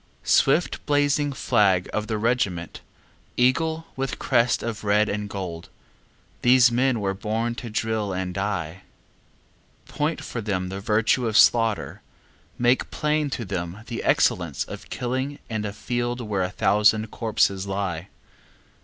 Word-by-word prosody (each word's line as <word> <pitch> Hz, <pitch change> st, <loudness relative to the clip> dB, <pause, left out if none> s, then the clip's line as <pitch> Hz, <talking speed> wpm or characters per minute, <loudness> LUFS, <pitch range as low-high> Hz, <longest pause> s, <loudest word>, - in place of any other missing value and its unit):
Swift 155 Hz, +6 st, +2 dB
blazing 145 Hz, 0 st, +2 dB
flag 105 Hz, -9 st, +2 dB
of 110 Hz, 0 st, -2 dB
the 110 Hz, -, -1 dB
regiment, 105 Hz, -7 st, -1 dB, 0.6 s
Eagle 160 Hz, +6 st, +1 dB
with 135 Hz, 0 st, -3 dB
crest 120 Hz, -1 st, +2 dB
of 115 Hz, -2 st, -4 dB
red 105 Hz, +1 st, +3 dB
and 105 Hz, 0 st, -3 dB
gold, 90 Hz, -4 st, -6 dB, 0.7 s
These 125 Hz, 0 st, +6 dB
men 125 Hz, 0 st, +2 dB
were 100 Hz, -2 st, -1 dB
born 110 Hz, +4 st, -2 dB
to 120 Hz, -, -7 dB
drill 110 Hz, -2 st, -1 dB
and 90 Hz, -1 st, -3 dB
die. 95 Hz, -3 st, -3 dB, 1.1 s
Point 150 Hz, +3 st, -2 dB
for 115 Hz, -, -5 dB
them 95 Hz, -3 st, -2 dB
the 95 Hz, +1 st, -5 dB
virtue 110 Hz, +4 st, +1 dB
of 110 Hz, -1 st, +1 dB
slaughter, 115 Hz, -3 st, +3 dB, 0.6 s
Make 120 Hz, +1 st, +2 dB
plain 150 Hz, -1 st, 0 dB
to 120 Hz, -4 st, -4 dB
them 90 Hz, +1 st, -5 dB
the 120 Hz, -1 st, -5 dB
excellence 85 Hz, -6 st, +1 dB
of -, -, -10 dB
killing 130 Hz, +3 st, -3 dB
And 110 Hz, -1 st, -2 dB
a -, -, -4 dB
field 120 Hz, +3 st, -3 dB
where 105 Hz, -5 st, -2 dB
a 90 Hz, -, 0 dB
thousand 105 Hz, +2 st, +2 dB
corpses 100 Hz, -4 st, 0 dB
lie. 95 Hz, -3 st, -3 dB
110 Hz, 140 wpm, -24 LUFS, 100-125 Hz, 1.1 s, These